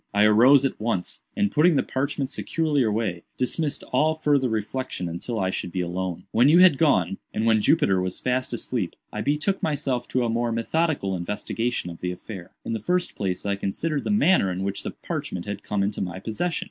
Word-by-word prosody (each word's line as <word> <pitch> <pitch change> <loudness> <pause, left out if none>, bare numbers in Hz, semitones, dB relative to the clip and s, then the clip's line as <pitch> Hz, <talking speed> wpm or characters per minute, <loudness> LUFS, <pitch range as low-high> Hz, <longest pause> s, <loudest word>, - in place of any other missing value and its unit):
I 105 - +5
arose 125 +6 +6
at 135 - -2
once, 105 -6 -2
and 205 -1 +1
putting 160 +2 +4
the - - +3
parchment 140 0 -2
securely 155 -3 0
away, 105 -6 0 0.2
dismissed 145 +3 -1
all 155 +5 +3
farther 145 -4 +2
reflection 110 -2 -3
until 85 +7 -4
I 95 -1 0
should 90 - -4
be 90 - -1
alone. 90 0 -3
"When 120 +5 +5
you 165 - +6
had 180 -6 +7
gone, 95 - +2 0.2
and 110 - 0
when 110 -1 +4
Jupiter 105 - +3
was 90 0 -3
fast 130 0 -1
asleep, - - -3 0.2
I 105 - -3
betook 150 - 0
myself 135 -5 -1
to 125 -1 0
a - - +1
more 115 +1 0
methodical 115 - 0
investigation 105 +2 -2
of 85 - -11
the 90 - -1
affair. 90 0 -8 0.2
In - - -2
the 110 - -2
first 180 - 0
place 95 -2 -3
I 100 0 +1
considered 140 +10 -2
the - - -3
manner 190 - +4
in 90 +1 -3
which 100 0 -3
the - - -4
parchment 90 -2 -5
had 100 -1 -5
come 100 -1 -1
into 100 +1 -2
my 90 -1 -3
possession. 115 - -2
115 Hz, 205 wpm, -25 LUFS, 95-145 Hz, 0.2 s, had